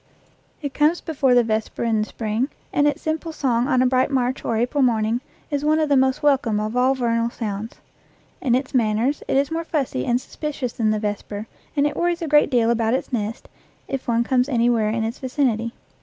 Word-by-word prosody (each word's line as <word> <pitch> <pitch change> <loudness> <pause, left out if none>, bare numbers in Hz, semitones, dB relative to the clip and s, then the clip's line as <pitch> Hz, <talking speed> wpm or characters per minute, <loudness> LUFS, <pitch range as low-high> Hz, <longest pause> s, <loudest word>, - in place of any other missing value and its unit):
It 285 -1 -3
comes 305 +4 +3
before 275 -6 +1
the 245 - +5
vesper 220 0 -2
in 225 -2 +1
the 215 - -2
spring, 225 +4 -2 0.2
and 290 0 +3
its 290 - -1
simple 320 +1 -2
song 250 -5 0
on 255 -3 +3
a - - +3
bright 255 +1 +2
March 260 -1 0
or 230 - 0
April 250 +5 0
morning 230 -1 +2 0.3
is 285 -1 -1
one 305 +1 +3
of 310 -1 +1
the 285 - +4
most 265 +1 +2
welcome 265 -7 +2
of 215 +2 -3
all 255 +2 +3
vernal 230 -2 0
sounds. 215 -1 -5 0.7
In 245 -3 +2
its 260 +2 -2
manners 235 +3 +1
it - - +1
is 280 +2 +1
more 330 +1 -1
fussy 280 - -2
and 240 +1 +2
suspicious 285 -3 -5
than 225 -4 0
the 215 - +1
vesper, 210 0 -4 0.3
and 285 -1 +3
it 295 - -1
worries 345 0 0
a - - -2
great 295 -1 +4
deal 235 -3 +3
about 230 0 +1
its 265 - -4
nest 220 -1 -3 0.4
if 270 -2 -4
one 235 0 +2
comes 250 +2 +1
any 240 -2 +3
where 220 -3 +1
in 225 +1 -1
its 225 +3 -4
vicinity. 250 -4 0
250 Hz, 215 wpm, -22 LUFS, 225-285 Hz, 0.7 s, the